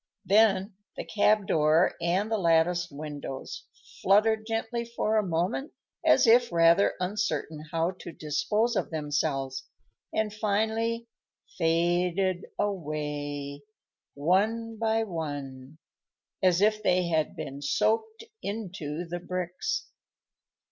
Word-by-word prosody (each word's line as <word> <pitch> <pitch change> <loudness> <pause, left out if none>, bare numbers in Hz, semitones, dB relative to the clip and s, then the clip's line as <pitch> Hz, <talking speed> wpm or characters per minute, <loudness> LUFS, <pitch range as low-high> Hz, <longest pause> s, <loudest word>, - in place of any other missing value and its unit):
Then 200 0 +4 0.2
the - - -4
cab 210 -1 +2
door 160 -2 +3
and 185 +6 0
the 220 - +1
latticed 170 0 +2
windows 145 -2 -7 0.3
fluttered 215 +3 +3
gently 225 +1 -2
for 230 -2 -1
a 215 - +4
moment, 180 - -1 0.3
as - - +5
if 240 0 +5
rather 170 +3 +4
uncertain 180 -5 -2
how 165 +2 +1
to - - -8
dispose 210 +11 0
of - - -1
themselves, 145 -3 -2 0.4
and 215 -1 -1
finally 220 +2 0 0.5
faded 175 +3 +1
away, 150 -6 -3 0.5
one 215 +9 +1
by 225 0 +1
one, 145 -6 -6 0.6
as 185 -1 +3
if 215 +1 +3
they 180 -3 +2
had 160 -2 0
been 140 +1 -6
soaked 220 +9 0 0.2
into 180 -6 -4
the 175 +1 -5
bricks. 180 - -3
180 Hz, 110 wpm, -28 LUFS, 155-215 Hz, 0.6 s, as